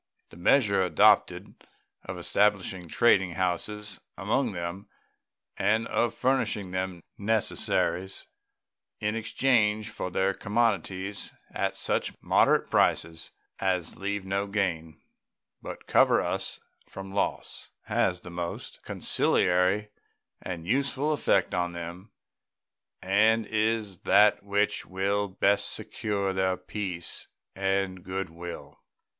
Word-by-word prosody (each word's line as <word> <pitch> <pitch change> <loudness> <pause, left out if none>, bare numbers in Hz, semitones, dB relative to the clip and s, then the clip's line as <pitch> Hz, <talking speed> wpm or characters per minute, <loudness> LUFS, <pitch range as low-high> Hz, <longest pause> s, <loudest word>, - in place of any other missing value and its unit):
The - - -13
measure 100 +2 +3
adopted 90 -4 +3 0.5
of - - -7
establishing 95 -3 +1
trading 95 -2 +3
houses 100 +4 -2 0.2
among 115 +4 0
them 85 +2 -5 0.7
and 110 +2 +2
of 120 0 0
furnishing 125 -7 0
them 95 -2 -3 0.2
necessaries 100 -3 0 0.7
in 105 +1 -1
exchange 110 -2 +1
for 95 - -4
their 95 +2 +1
commodities 100 -3 -1 0.2
at - - -1
such - - -2
moderate - - +3
prices 80 0 +1 0.3
as 90 -3 -1
leave 100 0 -3
no 100 +1 -1
gain, 85 -6 -2 0.6
but - - -8
cover - - +4
us - - -2 0.3
from 95 0 -8
loss, 100 - -2
has 90 -1 0
the 90 - -10
most 85 0 -5
conciliatory 90 +4 +2 0.5
and 85 -3 -6
useful 140 - +1
effect 100 -9 +1
on 90 -1 -1
them, 85 +5 -8 0.9
and 110 +4 +3
is 110 -3 -1
that 105 +2 +5
which 100 +1 0
will 100 +2 -1
best 100 +1 +1
secure 100 -2 -2
their 95 -1 +1
peace 90 -2 -4 0.3
and 95 -1 -1
good 95 -2 -4
will. 85 +1 -9
95 Hz, 110 wpm, -28 LUFS, 90-105 Hz, 0.9 s, that